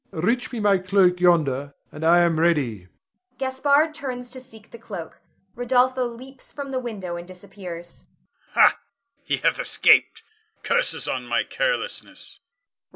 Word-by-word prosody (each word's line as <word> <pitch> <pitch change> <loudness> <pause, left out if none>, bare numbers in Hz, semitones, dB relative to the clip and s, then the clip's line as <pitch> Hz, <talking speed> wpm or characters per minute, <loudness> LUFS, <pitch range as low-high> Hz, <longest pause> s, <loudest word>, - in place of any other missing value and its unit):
Reach 230 +10 -1
me 240 - -4
my 205 -2 +3
cloak 185 -1 +3
yonder, 145 -6 +2 0.2
and 150 - -8
I 170 +2 +5
am 170 -2 +2
ready. 135 - +1 0.5
[Gaspard 280 +4 +2
turns 250 -5 -6
to 260 - -7
seek 225 -4 -16
the 235 - -11
cloak. 195 -8 -9 0.3
Rodolpho 250 +1 +2
leaps 265 +1 -12
from 280 -1 -7
the 260 - -1
window 200 -8 -5
and 175 0 -9
disappears. 180 -2 -10 0.5
Gasp. - - +6
Ha! - - -32 0.4
he 285 - -1
hath - - +1
escaped, - - +3 0.4
curses 485 +1 +1
on - - -3
my - - +1
carelessness! - - -3
205 Hz, 145 wpm, -23 LUFS, 175-260 Hz, 0.5 s, Gasp